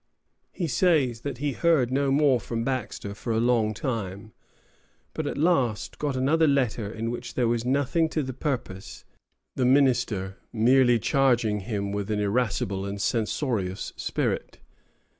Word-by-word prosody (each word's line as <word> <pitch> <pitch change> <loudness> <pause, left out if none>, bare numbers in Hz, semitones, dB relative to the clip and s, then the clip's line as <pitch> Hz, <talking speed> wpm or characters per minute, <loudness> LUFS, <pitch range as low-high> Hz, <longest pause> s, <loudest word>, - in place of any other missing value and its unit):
He 180 - -3
says 140 -7 +2
that 140 -2 -4
he 145 +2 -1
heard 140 -4 +2
no 140 +1 +1
more 140 -3 +4
from 115 +2 -4
Baxter 120 -5 -3
for 115 +3 -5
a 110 - +1
long 115 -2 +2
time, 110 -3 -4 0.8
but - - -3
at - - -3
last 140 -9 +1
got 145 -3 -1
another 155 +5 +3
letter, 120 -7 0
in 115 +1 -3
which 120 - -6
there 125 -2 +2
was 115 0 0
nothing 140 +5 +1
to 155 -1 -1
the 130 0 -5
purpose, 125 -8 -5 0.5
the 130 - 0
minister 125 -8 +2
merely 120 +2 +4
charging 120 -3 +2
him 100 -1 -3
with 100 0 -3
an 105 -1 0
irascible 100 -2 0
and 100 0 -5
censorious 105 -3 -1
spirit. - - -2
120 Hz, 150 wpm, -26 LUFS, 105-135 Hz, 0.8 s, more